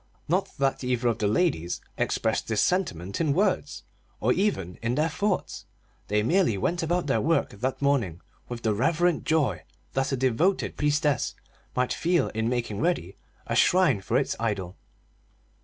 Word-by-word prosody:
Not - - -1
that 135 -1 0
either 125 -1 +1
of 115 - -1
the 105 - +1
ladies 100 - 0 0.2
expressed 110 -1 0
this 110 -2 0
sentiment 100 - -1
in 155 -4 +2
words, 190 +3 0 0.4
or - - +2
even 95 - -1
in 115 +2 0
their 155 +3 +2
thoughts; 200 +4 -2 0.4
they 105 +1 +1
merely 165 - +2
went 170 - 0
about 175 +2 0
their 135 - +1
work 165 +2 +1
that 130 +7 -3
morning 120 - +1 0.3
with 120 -1 -6
the 110 - +2
reverent 165 +9 +1
joy 140 - +1 0.3
that 135 +1 0
a 135 - 0
devoted 130 +10 +1
priestess 150 -2 +1 0.4
might 125 0 +1
feel 175 0 +1
in 110 +1 -1
making 120 -4 -2
ready 145 - 0 0.3
a - - -2
shrine 175 - +4
for 115 +5 0
its 135 - 0
idol. 100 -5 -2
130 Hz, 160 wpm, -26 LUFS, 110-165 Hz, 0.4 s, shrine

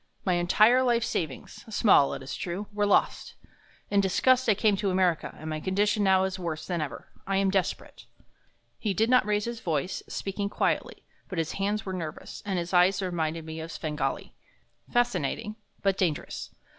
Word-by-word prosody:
My 185 - +2
entire 210 +8 +4
life 240 -2 +2
savings 155 - -4
small, 205 -9 +4
it - - -8
is 135 - -5
true 185 +4 -4
were 205 0 +1
lost. - - +1 0.6
In 200 -1 +4
disgust 255 +7 +3
I 210 - +5
came 210 +1 +3
to 200 0 0
America, 185 -3 +1
and 155 - -8
my 155 -1 -3
condition 205 +4 +1
now 190 -1 +4
is 190 0 -2
worse 165 -3 -4
than 175 -3 -2
ever. 150 - -6 0.2
I 195 0 +1
am 195 0 +2
desperate." 190 -2 -2 0.7
He 205 -4 -1
did 225 +5 +2
not 250 -4 +5
raise 210 0 +1
his 235 -1 -4
voice, 165 0 -2
speaking 200 +1 -3
quietly, - - -1 0.3
but 185 - -5
his 165 -1 -1
hands 205 +2 -1
were 190 - -4
nervous, 160 -4 -6
and 190 -2 0
his 175 +1 -3
eyes 180 +2 +5
reminded 165 -4 -2
me 160 0 -6
of 160 +1 -6
Svengali 155 -2 -3 0.6
fascinating, 215 - 0 0.3
but 195 -1 +1
dangerous. 165 -6 -2
190 Hz, 180 wpm, -27 LUFS, 170-210 Hz, 0.7 s, I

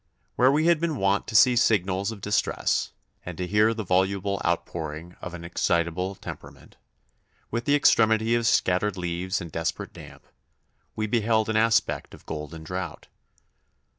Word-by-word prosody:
Where 130 +2 +5
we 155 +3 +2
had 170 -2 +4
been 165 -2 -1
wont 100 0 +1
to 110 - -6
see 125 +2 +6
signals 100 -3 +1
of 105 -3 -9
distress, 105 +2 0 0.3
and 90 -2 -7
to 90 - -2
hear 105 +4 +3
the 110 -1 -3
voluble 95 +1 0
outpouring 80 +1 -3
of 90 0 -6
an 85 - -9
excitable 85 +2 -1
temperament, - - -11 0.8
with 120 +1 -2
the 145 - +3
extremity 110 -4 +3
of 120 -1 +1
scattered 95 -1 +2
leaves 90 +2 -2
and 85 -2 -8
desperate - - -3
damp, - - -13 0.7
we 110 - -1
beheld 110 0 +1
an 110 - -1
aspect 115 +1 +1
of - - -19
golden 80 +1 -7
drought. 90 +3 -6
100 Hz, 155 wpm, -25 LUFS, 90-115 Hz, 0.8 s, see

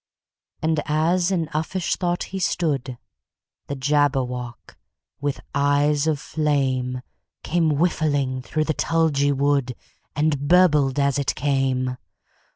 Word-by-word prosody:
And 160 -1 +1
as 170 +4 +2
in 175 -4 0
uffish 165 +4 -1
thought 175 -1 -1
he 190 - -6
stood, 140 -8 -1 0.7
The 140 - -3
Jabberwock, 130 -4 -1 0.4
with 145 -1 -2
eyes 145 +1 +2
of 155 -3 +1
flame, 130 -5 -1 0.4
Came 165 -1 +1
whiffling 145 -6 0
through 155 +4 -1
the 155 - -1
tulgey 155 -3 +1
wood, 140 -2 +1 0.4
And 145 -1 0
burbled 150 -6 +4
as 140 -1 +2
it 140 - -1
came! 130 -2 0
145 Hz, 115 wpm, -23 LUFS, 135-160 Hz, 0.7 s, burbled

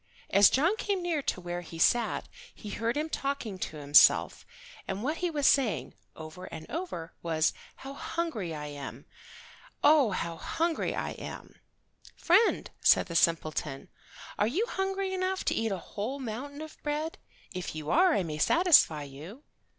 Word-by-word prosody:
As 200 0 +7
John 335 +10 +2
came 395 -4 -1
near 335 -4 0
to 225 - -2
where 175 0 -5
he 165 -1 -10
sat 235 +7 +2 0.3
he 210 - -9
heard 230 +4 -1
him 305 +1 -1
talking 275 -10 -3
to 155 - -5
himself, 145 0 +5 0.4
and 195 +3 -4
what 305 +5 -1
he 355 - -1
was 295 -4 -1
saying 265 -7 +2 0.2
over 160 +3 -9
and 160 -3 -9
over 305 - -5
was, 160 -1 +1 0.2
"How 270 +1 -9
hungry 280 - -3
I 150 -1 -5
am. 145 -1 -8 0.8
Oh, 295 -6 +6
how 170 -3 -3
hungry 330 - -1
I - - -3
am." - - -9 0.6
"Friend," 380 +7 +3
said - - +5
the 170 - -5
simpleton, 155 -4 0 0.5
"are 210 - +3
you 355 - 0
hungry 385 -2 -2
enough 375 0 -1
to - - +2
eat 225 -1 -1
a 195 - -1
whole 215 +9 -5
mountain 275 +4 -6
of 315 - -12
bread? 305 +2 -3 0.3
If 180 -3 -5
you 155 0 -4
are 360 +1 +5
I - - +1
may 155 -2 -5
satisfy 300 - +5
you." 155 - -11
230 Hz, 165 wpm, -29 LUFS, -, 0.8 s, As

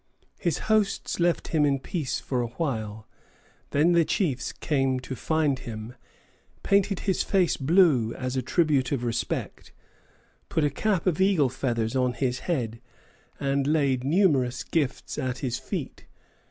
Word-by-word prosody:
His 170 -4 0
hosts 215 -4 +1
left 175 0 +1
him 155 -2 +2
in 140 -1 +3
peace 140 +1 -3
for 125 -2 -2
a 120 - -1
while; 110 -6 -4 0.6
then 150 +5 +3
the 170 -1 +5
chiefs 150 - -1
came 135 -3 0
to 130 +1 -6
find 150 +1 0
him, 110 0 -7 0.7
painted 200 -1 +2
his 190 -2 0
face 185 -4 +2
blue, 145 - +3
as 130 0 -3
a 130 - +1
tribute 140 -1 +1
of 135 -4 -1
respect, 115 -2 -3 0.8
put 160 - +1
a 145 - +2
cap 200 +3 0
of 185 -1 +1
eagle 185 -9 +4
feathers 115 -2 -2
on 125 -1 +2
his 125 -1 -1
head, 115 -8 -1 0.6
and 140 0 0
laid 140 -5 +2
numerous 140 -6 +2
gifts 145 -6 -2
at 130 -1 -2
his 125 -3 -3
feet. - - -6
140 Hz, 150 wpm, -26 LUFS, 125-170 Hz, 0.8 s, the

